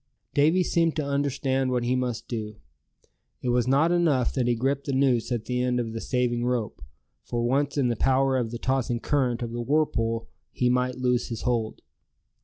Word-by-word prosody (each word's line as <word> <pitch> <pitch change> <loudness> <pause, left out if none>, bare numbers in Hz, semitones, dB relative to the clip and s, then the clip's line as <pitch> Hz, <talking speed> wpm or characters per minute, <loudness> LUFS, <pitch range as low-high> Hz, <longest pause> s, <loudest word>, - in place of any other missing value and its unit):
Davy 160 +6 +4
seemed 165 -1 +1
to 150 - -1
understand 135 -2 0
what 125 -1 0
he 125 +1 +1
must 125 -3 -2
do. 110 -3 -4 0.9
It 125 - 0
was 120 0 +2
not 140 +6 +3
enough 160 -8 +2
that 125 -3 0
he 120 - +2
gripped 135 +4 -1
the 140 - -1
noose 130 -3 +2
at 120 -3 -2
the 125 0 -1
end 125 0 +1
of 115 -2 -3
the 115 - -4
saving 125 -2 0
rope; 120 - -2 0.4
for 120 0 -2
once 140 +4 0
in 135 -3 +2
the 120 - 0
power 135 +3 +2
of 120 -3 0
the 120 - -5
tossing 130 -1 -1
current 125 -3 0
of 115 - -4
the 120 0 -3
whirlpool 115 -4 0 0.2
he 125 - +1
might 125 0 0
lose 125 -1 +1
his 115 - -5
hold. 115 -3 -1
125 Hz, 200 wpm, -26 LUFS, 120-135 Hz, 0.9 s, Davy